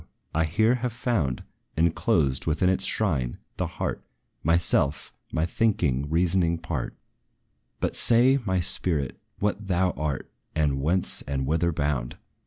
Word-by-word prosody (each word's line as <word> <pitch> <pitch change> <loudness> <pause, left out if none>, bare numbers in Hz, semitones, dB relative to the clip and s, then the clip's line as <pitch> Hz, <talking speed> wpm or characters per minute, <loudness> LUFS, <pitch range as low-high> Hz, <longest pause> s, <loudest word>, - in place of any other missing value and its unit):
I 80 +1 +2
here 110 +9 +3
have 125 -2 -2
found, 110 - -1 0.3
Enclosed 80 -5 +2
within 85 +4 +2
its 95 0 +2
shrine, 70 - 0 0.2
the - - -1
heart, - - -4 0.4
Myself, 80 -3 +1 0.2
my 80 - +1
thinking, 85 - 0
reasoning 85 +1 +2
part: 80 -5 -4 0.8
But - - -1
say, 125 +4 +5
my 95 -3 0
spirit, 80 -6 0 0.2
what 105 0 -2
thou 90 0 +2
art, 75 -5 -4 0.2
And 70 -3 +1
whence, 90 +6 0
and 70 -1 -1
whither 85 +4 +1
bound! 70 -5 -2
85 Hz, 130 wpm, -26 LUFS, 70-95 Hz, 0.8 s, say